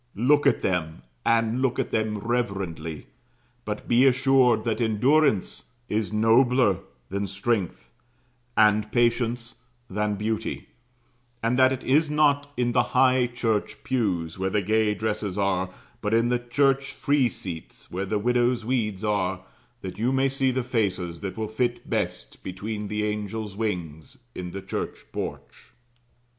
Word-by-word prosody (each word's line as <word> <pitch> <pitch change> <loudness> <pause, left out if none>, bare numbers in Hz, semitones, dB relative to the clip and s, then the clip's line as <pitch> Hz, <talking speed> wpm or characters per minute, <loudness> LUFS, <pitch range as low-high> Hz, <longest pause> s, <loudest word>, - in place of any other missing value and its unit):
Look 140 +7 +3
at - - +2
them, 80 -4 -1 0.2
and 115 +1 +2
look 130 -2 +1
at - - -1
them 110 -1 0
reverently; 100 -9 -3 0.6
but - - -5
be 125 +3 +5
assured 130 -3 +4
that 115 +1 -1
endurance 120 +1 +2 0.2
is 105 0 -1
nobler 115 -1 +4 0.3
than 100 +1 -2
strength, 95 - -2 0.7
and 105 0 +4
patience 120 0 0 0.3
than 105 +1 0
beauty; 110 +2 -3 0.7
and 120 +3 +1
that 130 0 +6
it 130 - -3
is 150 +4 +3
not 145 -1 +2
in 120 -1 +1
the 125 - +4 0.2
high 130 -1 +5
church 115 -3 -2
pews, 90 -10 -1
where 95 0 0
the 100 +1 0
gay 110 +1 +2
dresses 105 -3 -2
are, 95 -2 +1 0.3
but 105 +1 +1
in 115 +1 +3
the 125 0 +1
church 135 +2 +1
free 140 -3 +2
seats, 85 -6 -7
where 95 +2 -3
the 105 - 0
widows' 120 +1 +1
weeds 110 -5 -1
are, 95 -3 0 0.4
that 95 +1 -7
you 120 +4 +1
may 135 +1 +2
see 135 0 +1
the 130 0 0
faces 95 -8 -1
that 95 0 -5
will 110 -1 -2
fit 120 +3 -2
best - - -3
between 105 +3 -5
the 105 +1 -2
angels' 105 0 -3
wings, 85 -8 -4 0.2
in 90 -1 -5
the 95 +2 -7
church - - -5
porch. - - -6
110 Hz, 150 wpm, -25 LUFS, 100-125 Hz, 0.7 s, that